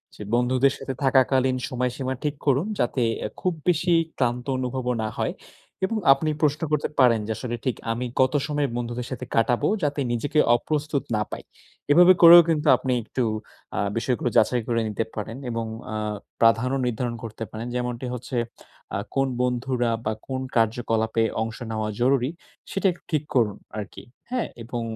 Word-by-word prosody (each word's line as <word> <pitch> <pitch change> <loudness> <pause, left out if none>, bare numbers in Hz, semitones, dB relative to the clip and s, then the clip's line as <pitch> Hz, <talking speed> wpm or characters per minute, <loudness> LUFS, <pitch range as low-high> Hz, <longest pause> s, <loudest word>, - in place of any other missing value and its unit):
যে, - - -12
বন্ধুদের 130 +3 +3
সাথে 135 - -5
থাকাকালীন 130 -1 +3
সময়সীমা 125 +1 -2
ঠিক 150 -1 -1
করুন, 140 +6 +2
যাতে 120 +1 +1 0.4
খুব 185 - 0 0.2
বেশি 175 +1 +2 0.3
ক্লান্ত 125 -1 0
অনুভবও 125 0 -2
না - - -1
হয়। - - -1 0.5
এবং 225 +4 -2 0.2
আপনি 155 +3 -2
প্রশ্ন 150 0 +2
করতে 150 -1 +1
পারেন 120 -4 +5
যে, - - -2
আসলে 120 -2 -4
ঠিক 130 - +1 0.2
আমি 120 +2 -2 0.2
কত 130 0 +3
সময় 145 -2 0
বন্ধুদের 120 0 -3
সাথে 130 -1 -5
কাটাবো, 120 +1 +2 0.2
যাতে 145 0 0
নিজেকে 145 +6 0 0.2
অপ্রস্তুত 150 +2 -1
না 105 - +1
পাই। - - -6 0.5
এভাবে 175 +4 +8
করেও 170 0 +11
কিন্তু 155 -1 +1
আপনি 130 - -2
একটু 125 +3 -2 0.5
আ - - +1 0.2
বিষয়গুলো 120 +1 0
যাচাই 120 +2 +3
করে 115 -1 +1
নিতে 110 +1 -1
পারেন 110 +2 -5
এবং 115 0 -2 0.3
আ - - -3 0.4
প্রাধান্য 115 +3 +4
নির্ধারণ 120 0 -2
করতে 115 0 -6
পারেন। 110 +2 -5
যেমনটি 125 0 -3
হচ্ছে, 125 +1 -5 0.6
আ - - +1 0.2
কোন 135 0 +2
বন্ধুরা 125 -1 0
বা 110 - 0
কোন 130 -1 -3 0.2
কার্যকলাপে 115 0 +1 0.2
অংশ 110 0 -3
নেওয়া 110 -1 -2
জরুরি, 130 0 +3 0.4
সেটা 195 - -3
একটু 175 - -13
ঠিক 155 -2 +1
করুন 110 -5 +2 0.2
আরকি। 105 -2 -7 0.3
হ্যাঁ? 250 -2 -1 0.2
এবং 120 +1 -4
125 Hz, 165 wpm, -24 LUFS, 115-140 Hz, 0.6 s, করেও